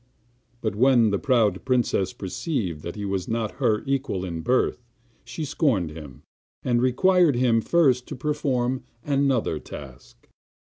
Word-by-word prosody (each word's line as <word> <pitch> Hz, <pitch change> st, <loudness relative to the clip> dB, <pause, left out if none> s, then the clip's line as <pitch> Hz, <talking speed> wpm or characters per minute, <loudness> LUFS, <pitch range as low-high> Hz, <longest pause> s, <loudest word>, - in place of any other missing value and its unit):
But 110 Hz, -3 st, -1 dB
when 120 Hz, -2 st, +4 dB
the 100 Hz, -, 0 dB
proud 110 Hz, -8 st, +2 dB
princess 120 Hz, -7 st, +1 dB
perceived 95 Hz, -, -3 dB
that 85 Hz, -, -6 dB
he 105 Hz, -1 st, -5 dB
was 95 Hz, -2 st, -2 dB
not 115 Hz, -2 st, -2 dB
her 110 Hz, -4 st, +2 dB
equal 135 Hz, -9 st, -1 dB
in 85 Hz, -2 st, -4 dB
birth, 125 Hz, +4 st, +1 dB, 0.4 s
she 125 Hz, +7 st, -5 dB
scorned 125 Hz, -, 0 dB
him, 75 Hz, -5 st, -11 dB, 0.4 s
and 120 Hz, -1 st, +1 dB
required 170 Hz, +5 st, +3 dB
him 120 Hz, -2 st, +3 dB
first 130 Hz, -5 st, +2 dB
to 145 Hz, -, -6 dB
perform 130 Hz, -2 st, -1 dB, 0.2 s
another 135 Hz, -, +1 dB
task. 70 Hz, -5 st, -12 dB
120 Hz, 140 wpm, -24 LUFS, 95-135 Hz, 0.4 s, when